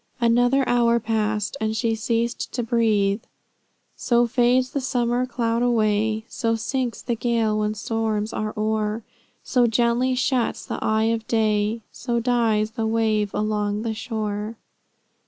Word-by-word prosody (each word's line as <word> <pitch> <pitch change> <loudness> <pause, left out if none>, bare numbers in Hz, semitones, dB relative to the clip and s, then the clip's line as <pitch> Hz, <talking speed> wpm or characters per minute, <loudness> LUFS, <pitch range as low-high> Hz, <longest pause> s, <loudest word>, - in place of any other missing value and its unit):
Another 245 +3 +3
hour 235 -1 +3
passed, 215 -1 -1
and 220 0 -1
she 230 0 +1
ceased 230 +2 -1
to 245 - -1
breathe." 220 -3 +1 0.7
"So 240 0 +2
fades 250 +2 +2
the 285 -2 -2
summer 245 -1 0
cloud 235 -2 -1
away; 220 -2 +1
So 230 -2 -1
sinks 240 +2 -3
the 240 - -1
gale 225 -2 0
when 210 0 -1
storms 220 0 -2
are 215 0 -2
o'er; 215 +1 -1 0.4
So 245 -2 +2
gently 235 +3 +2
shuts 250 -1 0
the - - -4
eye 220 0 +2
of 225 -1 -4
day; 215 0 +1
So 240 -1 -2
dies 225 -3 +1
the 225 -1 -2
wave 220 -2 +1
along 210 0 -1
the 225 -1 -2
shore." 215 -1 -4
225 Hz, 140 wpm, -23 LUFS, 215-240 Hz, 0.7 s, Another